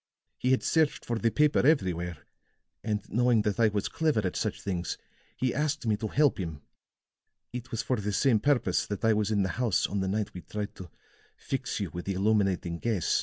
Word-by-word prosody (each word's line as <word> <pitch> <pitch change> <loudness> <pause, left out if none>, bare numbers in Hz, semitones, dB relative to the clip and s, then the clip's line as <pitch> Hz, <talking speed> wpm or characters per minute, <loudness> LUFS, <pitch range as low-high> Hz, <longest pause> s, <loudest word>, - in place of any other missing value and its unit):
He 125 - 0
had 130 - +3
searched 160 -2 +1
for 115 -1 -1
the 115 - +2
paper 150 +4 +3
everywhere; 90 - +1 0.6
and 105 -1 -2
knowing 120 -1 +3
that 105 +1 -1
I 115 - +6
was 105 -1 -1
clever 150 -9 +1
at 90 - -2
such - - -2
things, 90 -3 -3 0.4
he 130 -2 0
asked 150 -1 -1
me 110 -2 +2
to 110 +1 -3
help 145 +2 +2
him. 80 -6 -5 0.9
It 125 0 -6
was 115 - -2
for 130 - 0
the 105 0 -2
same 115 +2 +3
purpose 120 -8 +1
that 100 +1 -3
I 110 - +5
was 105 -1 +1
in 105 -2 +2
the 95 - -1
house 115 -7 +2
on 100 - -2
the 95 - -1
night 105 +1 -1
we 90 - -7
tried 105 +1 -5
to 90 -2 -9 0.5
fix - - -3
you - - -3
with 85 - -6
the 95 - -1
illuminating 95 -4 +1
gas. 110 -7 +1
105 Hz, 210 wpm, -29 LUFS, 95-125 Hz, 0.9 s, I